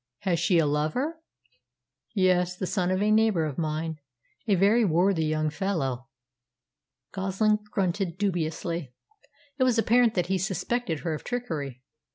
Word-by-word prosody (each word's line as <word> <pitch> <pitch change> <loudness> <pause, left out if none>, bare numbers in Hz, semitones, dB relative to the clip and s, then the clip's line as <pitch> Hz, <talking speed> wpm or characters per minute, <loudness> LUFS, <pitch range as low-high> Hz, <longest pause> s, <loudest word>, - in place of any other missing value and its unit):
"Has 180 -4 0
she 185 -5 +3
a 165 - +4
lover?" 155 - -1 0.9
"Yes; 180 -2 +2
the 185 - -2
son 180 -1 0
of 185 +2 +1
a 210 - +2
neighbour 215 -6 +3
of 150 +1 -4
mine, 160 0 -2 0.5
a 205 - +4
very 205 +6 +4
worthy 175 -2 +2
young 155 0 0
fellow." 140 -10 -2 1.0
Goslin 195 +2 +1
grunted 190 -4 -1
dubiously. 170 -6 -2 0.6
It - - +4
was 250 -2 +3
apparent 230 0 +3
that 180 -3 +1
he 190 +1 0
suspected 190 - -2
her 160 +3 -2
of 155 - -6
trickery. 150 - -4
180 Hz, 145 wpm, -27 LUFS, 160-210 Hz, 1.0 s, a